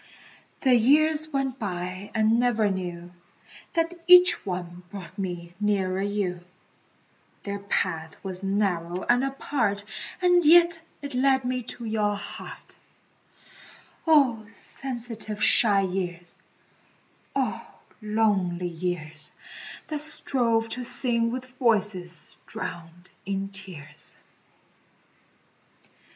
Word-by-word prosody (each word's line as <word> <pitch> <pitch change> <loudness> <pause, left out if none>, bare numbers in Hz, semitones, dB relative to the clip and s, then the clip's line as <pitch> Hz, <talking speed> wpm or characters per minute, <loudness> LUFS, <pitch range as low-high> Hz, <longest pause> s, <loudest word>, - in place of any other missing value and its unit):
The 260 -2 +4
years 305 +6 +4
went 270 -2 -1
by 185 -1 -4
and 220 +1 +3
never 225 -4 +2
knew 175 -2 -5 0.6
That 330 0 +1
each 360 - +7
one 180 -1 -4
brought 185 -3 -9
me 175 -3 -5
nearer 195 -3 0
you; 195 -3 -2 1.0
Their 200 0 -4
path 160 -5 -2
was 190 -1 -3
narrow 185 -3 -1
and 245 +2 +3
apart 255 -7 -1 0.3
And 355 -1 +4
yet 335 +1 +6 0.2
it 285 -1 -5
led 265 0 +2
me 255 0 -1 0.2
to 235 - -7
your 210 -2 0
heart 200 - -9 1.3
Oh, 270 -8 +4
sensitive, 225 -2 -4
shy 210 -2 +5
years, 175 -2 -4 1.0
oh, - - -1 0.4
lonely 200 -5 +1
years, 160 -3 -4 0.6
That 305 -2 -3
strove 240 -7 +2
to 250 +2 -3
sing 235 -1 +3
with 255 +2 -4
voices 195 - 0
drowned 170 +1 -7
in 195 0 -3
tears. 180 -7 -5
205 Hz, 100 wpm, -26 LUFS, 180-250 Hz, 1.3 s, each